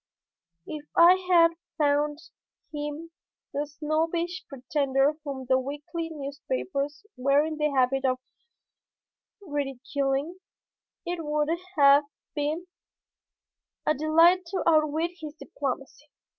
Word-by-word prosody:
If 300 -1 -6
I 340 +2 +9 0.2
had 335 -2 +6 0.3
found 295 -1 +2 0.6
him 295 +2 -5 0.4
the 290 +1 -1
snobbish 325 +4 -2
pretender 275 +1 +1
whom 275 -3 -5
the 260 +1 +3
weekly 295 +5 -5
newspapers 290 - -4
were 275 +3 +3
in 315 -1 -4
the 300 0 +1
habit 270 -1 +2
of 255 -1 +2 1.3
ridiculing, 280 +1 -2 0.7
it 345 -1 -3
would 300 0 0 0.3
have 285 0 +7 0.3
been 305 +4 -2 1.2
a 305 - +3
delight 330 +5 +4
to 370 +2 -2
outwit 315 +1 +3
his 305 -2 -7
diplomacy. 275 0 -5
295 Hz, 105 wpm, -27 LUFS, 280-325 Hz, 1.3 s, I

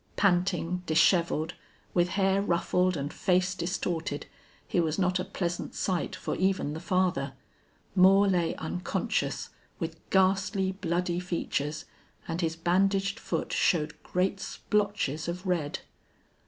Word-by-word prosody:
Panting, 180 -2 +1
disheveled, 165 0 +3 0.4
with 175 0 +3
hair 195 0 +3
ruffled 180 -1 +1
and 140 +1 -4
face 185 0 +2
distorted, 170 -4 -2 0.4
he - - +1
was 160 -2 +1
not 185 -1 +2
a - - 0
pleasant 175 -2 -3
sight 185 -3 -1
for - - -3
even 185 -5 +1
the 160 - -5
father. 175 -7 0 0.6
Moore 195 +2 +6
lay 175 -4 +1
unconscious, 180 +3 -2 0.3
with 165 -2 -4
ghastly, 190 0 +2
bloody 180 -2 -1
features, 155 -4 -2 0.4
and 165 +2 -2
his 165 -1 0
bandaged 195 +4 +1
foot - - -3
showed 160 -3 +2
great 190 +2 0
splotches 200 -9 -1
of 180 +3 -4
red. 170 -6 -1
180 Hz, 125 wpm, -29 LUFS, 165-190 Hz, 0.6 s, Moore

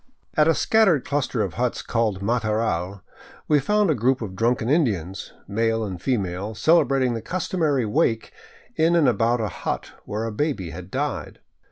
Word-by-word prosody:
At 150 -1 +4
L 165 - +4
scattered 200 - +3
cluster 135 -5 -1
of 95 - -4
huts 125 0 -1
called 110 -5 -1
Mataral 105 -4 -1 0.5
we 150 -1 +4
found 210 +5 +2
a - - +4
group 130 +1 +1
of 95 -3 -6
drunken 115 +2 +1
Indians, 100 - 0 0.2
male 115 +2 0
and 95 -4 -6
female, 100 -3 -2
celebrating 135 -1 +3
the 115 - -4
customary 160 -7 0
wake 115 -1 0 0.4
in 165 +2 +3
and 160 -5 +4
about 120 -1 +2
a 110 - 0
hut - - -4
where 105 +2 -3
a 115 - -3
baby 105 - -2
had - - -9
died. - - -3
115 Hz, 165 wpm, -23 LUFS, 105-145 Hz, 0.5 s, At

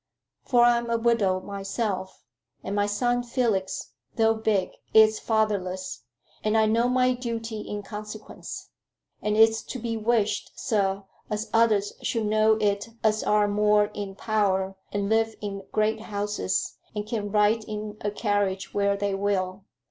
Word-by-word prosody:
For 245 -2 +3
I'm 235 -1 +3
a 230 - +2
widow 225 -5 +2
myself, 195 0 -4 0.4
and 200 - -3
my 205 0 +2
son 245 +4 +1
Felix, 230 -6 -1 0.2
though 225 -1 +4
big, 215 -4 0 0.2
is 220 0 +7
fatherless, 190 - -1 0.4
and 215 +1 +2
I 220 - +5
know 230 +3 +2
my 255 0 +3
duty 230 -3 -4
in 205 -1 -5
consequence. 210 +1 -8 0.5
And 210 0 0
it's 225 0 +5
to - - -7
be 230 -1 -3
wished, 215 -2 0
sir, 200 -4 0 0.3
as 210 +1 -3
others 220 -3 +3
should 225 -2 -1
know 215 +1 +4
it 205 +1 0
as 215 0 +3
are 210 0 +3
more 210 0 +3
in 200 -2 -5
power 195 -3 0 0.2
and 200 -1 -1
live 225 +1 +2
in 195 -2 -6
great 215 +1 +1
houses, 205 -2 -2 0.2
and 210 0 -2
can 210 -2 -3
ride 210 +2 +3
in 210 0 -5
a 205 - +1
carriage 205 -2 -1
where 200 0 +2
they 200 0 -1
will. 195 -1 -1
210 Hz, 150 wpm, -26 LUFS, 200-225 Hz, 0.5 s, is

